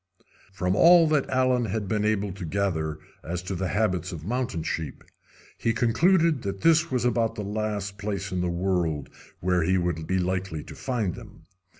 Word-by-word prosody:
From 90 -1 -1
all 170 +6 +7
that 150 -3 +1
Allen 130 -2 +2
had 105 0 -3
been 105 0 0
able 105 -2 0
to 95 -1 -8
gather 80 -4 -1 0.3
as 90 +2 -4
to 95 - -4
the 95 +1 -2
habits 90 0 0
of 80 -3 -7
mountain 120 -6 -2
sheep 80 -3 -4 0.6
he 115 - +1
concluded 160 +6 +3
that 100 -1 -4
this 165 0 +4
was 125 -2 0
about 115 -2 +1
the 105 - -4
last 105 -1 -3
place 100 -1 -3
in 90 -1 -1
the 90 - 0
world 85 -5 -1 0.3
where 90 0 +2
he 95 +4 +2
would 85 -3 -2
be 95 - +1
likely 90 -3 -2
to - - -10
find 115 -9 -2
them. - - -12
100 Hz, 185 wpm, -26 LUFS, 90-115 Hz, 0.6 s, all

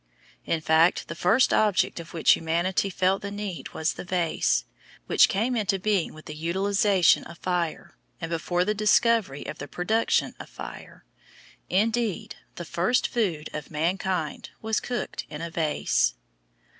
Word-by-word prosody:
In 165 - 0
fact 160 +3 +3
the - - -3
first 225 +9 +3
object 210 -4 +2
of 165 -1 -9
which 165 - +3
humanity 170 +4 +1
felt 190 +1 +1
the 200 - -4
need 205 -3 -5
was 160 0 -1
the - - -7
vase, 175 -2 0 0.4
which - - +5
came 230 +6 0
into 200 -4 +1
being 195 -2 0
with 155 - -13
the 155 - -7
utilisation 190 +4 +2
of 170 - -11
fire, 175 -3 -3 0.2
and 165 -1 -5
before 175 +2 0
the 210 - +1
discovery 215 - +2
of - - -7
the - - -6
production 215 +9 0
of - - -9
fire. - - -10 0.6
Indeed 220 +1 0 0.2
the 175 - -6
first 180 +11 +1
food 175 -10 -1
of 150 -2 -6
mankind 170 +1 -2
was 220 -2 0
cooked 240 +1 -4
in 150 - -7
a 170 0 -5
vase. 155 - +1
185 Hz, 155 wpm, -26 LUFS, 165-210 Hz, 0.6 s, which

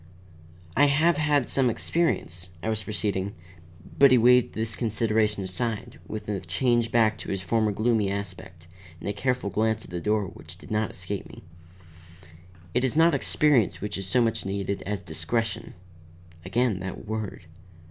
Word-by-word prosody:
"I 145 - +6
have 150 +4 +3
had 150 -4 +2
some 130 -2 +2
experience," 95 - -1
I 110 - -1
was 110 -1 -1
proceeding 100 -2 -2 0.6
But 140 - +9
he 125 - +6
waved 125 +1 +5
this 110 -1 -1
consideration 110 -2 0
aside, 105 +4 -3
with 110 -1 -6
a 105 -2 -1
change 115 +6 +1
back 110 -2 +3
to - - -7
his 95 -1 -2
former 110 +3 +1
gloomy 110 -1 +1
aspect, 95 -4 -6 0.3
and - - -7
a 100 - 0
careful 125 0 -1
glance 110 0 0
at - - -14
the 85 -1 -4
door 105 +1 +1
which 90 -2 -11
did - - -13
not 110 0 +1
escape 95 +2 -5
me. - - -13 1.3
"It 125 - +2
is 130 0 0
not 165 +2 +5
experience 145 -9 +2
which 105 - -4
is 95 -1 -3
so 120 +5 +3
much 115 -1 0
needed 100 0 -2
as 100 -2 -3
discretion." 95 +7 -2 0.7
Again 105 +1 +1
that 95 +2 -6
word. 110 -1 -5
110 Hz, 165 wpm, -26 LUFS, 95-120 Hz, 1.3 s, But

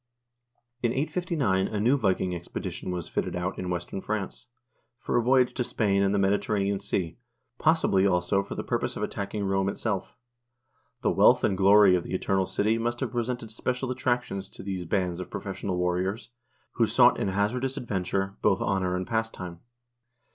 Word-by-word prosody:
In 120 -1 +1
859 140 - 0
a 105 - -3
new 120 +6 +4
Viking 95 -7 +1
expedition 85 +1 -5
was 90 -2 -3
fitted - - -2
out 90 +2 -3
in 90 - -3
western 90 +2 -4
France 110 +4 -4 0.5
for - - -3
a 120 - +4
voyage 125 +1 +3
to 125 - -1
Spain 100 -4 +1
and 100 0 +2
the 100 - +1
Mediterranean 100 0 +1
Sea, 95 -1 -3 0.4
possibly, 155 - +3
also, 90 +1 +2
for - - -7
the - - -3
purpose - - -2
of - - -3
attacking 100 +1 -3
Rome 95 0 +1
itself. 95 -1 -3 0.9
The - - +3
wealth - - +5
and 95 - +2
glory 100 0 +6
of 90 - +1
the - - -4
Eternal 95 0 0
City 110 +2 +1
must 120 +1 -1
have 130 - -2
presented 120 -2 -3
special 125 +3 -2
attractions 120 -6 -1
to - - -11
these 95 -2 -4
bands 90 -1 -1
of 90 - -6
professional 95 -2 -4
warriors, 90 +6 -1 0.4
who 115 - +2
sought 125 +1 +5
in 115 - 0
hazardous 120 +8 -1
adventure 95 -4 -2
both - - +3
honor 95 -2 0
and 90 0 -2
pastime. 110 -6 -3
100 Hz, 170 wpm, -27 LUFS, 95-120 Hz, 0.9 s, glory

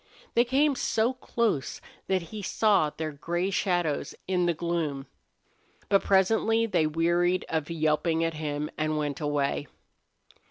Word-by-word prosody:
They 235 - +4
came 280 +4 +3
so 230 -1 +1
close 235 - -1 0.3
that 190 -2 +1
he 215 - -5
saw 200 -5 +2
their 155 +1 -5
gray 175 +6 -2
shadows 175 -6 0
in 180 -2 +1
the 170 - +2
gloom. 155 -5 -2 0.8
But 195 - +4
presently 220 +4 +3
they 175 -8 +1
wearied 170 +3 +1
of 160 -1 -2
yelping 160 0 +1
at 165 0 0
him 150 -1 -3
and 155 0 0
went 150 0 -2
away. 145 -1 -1
170 Hz, 135 wpm, -27 LUFS, 155-195 Hz, 0.8 s, They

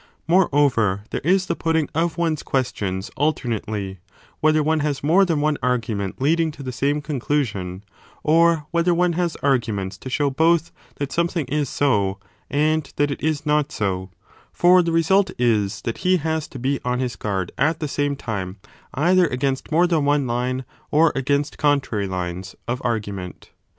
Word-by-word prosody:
Moreover, 140 - +3
there - - -2
is 185 +4 +3
the 170 - -1
putting 160 -3 0
of 165 +1 0
one 170 -2 +1
s 155 - -5
questions 100 -7 -2
alternately, 110 - -2 0.4
whether 155 0 +3
one 160 +1 +1
has 145 -2 -2
more 175 +7 +5
than 165 -5 0
one 150 0 +1
argument 115 -6 -1
lead 155 +5 +2
ing 165 -1 +2
to 145 -2 -10
the 130 - -4
same 140 +4 0
conclusion, 115 - -2 0.4
or 165 0 +4
whether 170 +1 +2
one 175 0 +2
has 170 -1 -1
arguments 110 -8 0
35 - - -35
to 130 - -6
show 145 +2 +1
both 165 +4 +2 0.2
that 140 -1 -4
something 170 -2 0
is 145 0 -1
so, 100 -9 +1 0.3
and 150 +1 +1
that 145 0 +1
it - - -5
is 155 -1 -1
not 150 -1 +1
so: 95 -2 -2 0.4
for 180 +1 +5
the 170 -1 -1
result 190 +4 +3
is 105 -5 +1
that 115 - -3
he 185 0 +3
has 160 -1 -2
to - - -10
be 135 +3 -1
on 125 0 0
his 125 -1 -2
guard 95 -4 -3
at 160 +4 +2
the 155 - -2
same 145 0 -1
time 100 -7 -5 0.4
either 175 +5 +4
against 135 +1 -2
more 170 +3 +4
than 165 -4 +1
one 145 -1 +2
line, 125 +2 -2 0.2
or 155 +1 +4
against 140 +2 -1
contrary 140 -9 +1
lines, 90 0 -4
of 125 +2 -2
argument. 100 -6 -4
145 Hz, 175 wpm, -22 LUFS, 115-160 Hz, 0.4 s, more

